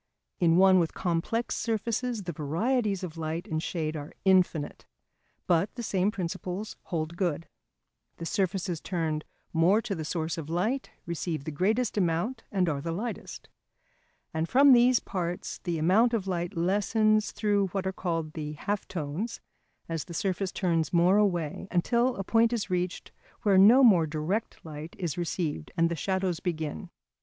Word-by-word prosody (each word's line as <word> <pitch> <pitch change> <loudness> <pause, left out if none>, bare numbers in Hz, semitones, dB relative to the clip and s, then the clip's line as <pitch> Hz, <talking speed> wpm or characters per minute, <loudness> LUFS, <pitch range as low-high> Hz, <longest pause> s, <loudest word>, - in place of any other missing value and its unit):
In 170 -1 +4
one 190 0 +6
with 165 -2 -1
complex 180 +7 -1
surfaces 230 0 -2
the 175 - -4
varieties 195 - 0
of 165 -2 -6
light 160 +3 -3
and 155 0 -2
shade 160 -2 -3
are 145 -1 -7
infinite. 180 -6 +2 0.6
But 175 +3 +1
the 240 - -5
same 195 -2 +1
principles 185 +1 -4
hold 165 -1 -3
good. 170 -3 -1 0.7
The 165 - -6
surfaces 185 -2 -1
turned 160 -4 -2 0.3
more 175 +6 +4
to 200 - -2
the 160 -4 -4
source 160 +1 -2
of 155 -1 -7
light 215 +11 -1 0.2
receive 170 -3 -3
the 155 - -4
greatest 210 - +1
amount, 180 +8 0
and 185 -3 +1
are 145 -4 -1
the 165 - -3
lightest. 220 +8 -5 0.9
And 160 +1 -1
from 275 +2 +6
these 245 0 +5
parts 175 -2 -4
the 175 -2 -1
amount 210 +9 +4
of 205 -4 -2
light 175 0 -3
lessens 210 +4 +2
through 205 -2 +1
what 190 +1 -3
are 190 - -1
called 165 -4 -3
the 150 -2 -5
half 200 +7 -3
tones 175 +7 -4 0.5
as 165 -2 -3
the 170 - -8
surface 195 -1 -1
turns 165 -4 0
more 175 +3 +4
away, 180 -4 0
until 235 +8 +2
a 195 - -3
point 225 +3 +3
is 210 -4 -2
reached 180 0 -2 0.3
where 200 -4 +5
no 235 +8 +8
more 180 -9 +6
direct 160 +9 -3
light 155 +1 -8
is 170 -4 -2
received, 165 - -3
and 165 0 +3
the - - 0
shadows 185 0 -1
begin. 160 - -4
180 Hz, 165 wpm, -28 LUFS, 165-205 Hz, 0.9 s, no